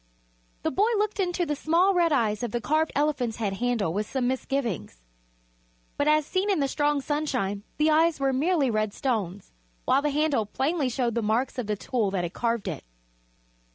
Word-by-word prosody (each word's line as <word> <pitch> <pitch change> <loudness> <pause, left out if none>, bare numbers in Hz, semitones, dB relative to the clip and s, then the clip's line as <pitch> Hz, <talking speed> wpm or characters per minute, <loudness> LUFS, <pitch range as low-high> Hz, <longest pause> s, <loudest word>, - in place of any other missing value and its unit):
The - - 0
boy 415 - +2
looked 420 0 -1
into 355 -2 0
the 300 -2 -1
small 340 +7 +3
red 345 -2 +3
eyes 215 -7 +1
of 240 - -2
the 240 - -2
carved 310 +6 +1
elephant's 280 -6 0
head 210 -4 -1
handle 230 -8 0
with 210 +2 -2
some 260 -2 -1
misgivings, 245 - -2 1.0
but 285 - 0
as 305 0 +4
seen 380 +5 -1
in 385 -5 +2
the 280 - +2
strong 290 +1 +1
sunshine 255 -9 -1 0.2
the 305 +1 +3
eyes 320 +1 +3
were 270 -1 +1
merely 290 -1 +2
red 215 -1 -1
stones, 205 -7 -2 0.3
while - - +3
the 295 - 0
handle 290 -7 +1
plainly 275 +5 0
showed 240 -1 -1
the 235 - 0
marks 235 +5 0
of 235 - -3
the 210 - 0
tool 220 0 -1
that 190 -2 -1
had 175 +1 -4
carved 235 -2 -1
it. - - -4
265 Hz, 190 wpm, -26 LUFS, 220-305 Hz, 1.0 s, as